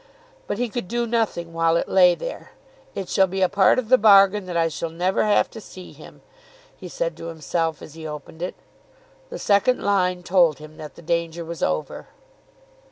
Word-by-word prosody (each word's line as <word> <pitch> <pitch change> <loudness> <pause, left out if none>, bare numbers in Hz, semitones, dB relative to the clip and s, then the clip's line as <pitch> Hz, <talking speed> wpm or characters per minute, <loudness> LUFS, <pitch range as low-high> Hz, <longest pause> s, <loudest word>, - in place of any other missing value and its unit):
But - - -3
he 245 +1 -1
could 230 -3 -5
do 240 +3 -1
nothing 220 -8 -2
while 165 0 +2
it - - -2
lay 180 -2 +5
there. - - -8 0.4
"It 190 - -4
shall 190 +1 +3
be 190 +1 -1
a - - +5
part 195 0 +3
of 255 -3 -1
the 255 - +6
bargain 200 -2 +5
that 175 -2 -3
I 165 -1 +2
shall 165 +1 -4
never 180 +5 0
have 210 -1 +3
to 225 - -10
see 185 -2 -12
him," - - -15 0.5
he - - -10
said - - -3
to - - -8
himself, 165 0 -3
as 155 - -11
he 160 -1 -8
opened 150 +2 -9
it. 180 - -4 0.7
The - - -6
second 205 +5 +2
line 185 -3 +1
told 175 -5 +3
him 155 +1 -13
that 150 -2 -10
the - - -14
danger 170 0 -2
was 170 0 -7
over. 75 0 -2
180 Hz, 200 wpm, -23 LUFS, 165-200 Hz, 0.7 s, the